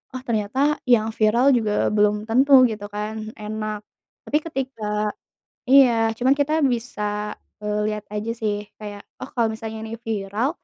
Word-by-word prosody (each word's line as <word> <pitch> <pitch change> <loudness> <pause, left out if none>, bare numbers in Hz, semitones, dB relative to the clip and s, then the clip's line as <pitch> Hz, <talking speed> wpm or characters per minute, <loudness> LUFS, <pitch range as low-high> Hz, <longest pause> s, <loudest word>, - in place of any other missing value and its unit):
"oh 255 - -4
ternyata 250 +7 +1
yang 225 -2 +4
viral 235 +5 +4
juga 215 -3 0
belum 210 0 +2
tentu," 260 +4 +6
gitu 205 -1 -6
kan, 210 +1 -3 0.2
enak, 215 0 -4 0.4
tapi 300 - +1
ketika 265 -6 -4 0.8
iya 240 -4 +5
cuman 260 +2 +4
kita 305 +3 +2
bisa, 210 -3 -3 0.3
eee, 210 0 -1
lihat 210 -1 -4
aja 210 +2 -3
sih 210 -1 -2
kayak 205 -1 -8 0.2
oh - - -11
kalau 230 -2 +1
misalnya 220 0 -6
ini 220 - -8
viral, 215 +3 -1
220 Hz, 145 wpm, -23 LUFS, 210-250 Hz, 0.8 s, tentu